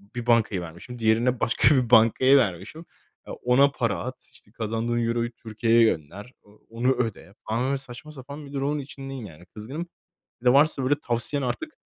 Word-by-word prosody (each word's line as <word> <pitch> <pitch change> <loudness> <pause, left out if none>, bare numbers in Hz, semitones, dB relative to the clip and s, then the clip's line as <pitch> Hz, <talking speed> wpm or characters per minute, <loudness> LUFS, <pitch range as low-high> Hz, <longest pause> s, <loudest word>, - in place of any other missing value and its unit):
bir 120 - -4
bankayı 110 -6 +2
vermişim. 85 +9 -10
Diğerine 115 +3 +2
başka 120 +6 +3
bir 125 -4 +1
bankayı 125 +4 +6
vermişim. 115 - -2 0.6
Ona 135 +3 +4
para 115 -10 -1
at, 125 +7 -8
işte 105 - -19
kazandığın 115 +1 -2
Euro'yu 120 0 -1
Türkiye'ye 115 0 +1
gönder, 100 - -2
o 105 +1 -23
onu 120 +3 0
öde 115 -4 -4
falan 115 +3 0
böyle 140 - 0
saçma 135 +3 -11
sapan 140 +1 -10
bir 140 - -13
durumun 140 +2 -1
içindeyim 135 -2 -8
yani. 85 -2 -13
Kızgınım. 130 - -7 0.5
Bir 125 - -12
de 125 - +7
varsa 140 0 +3
böyle 140 - +3
tavsiyen 120 +4 -2
artık 310 - -4
120 Hz, 170 wpm, -25 LUFS, 110-135 Hz, 0.6 s, de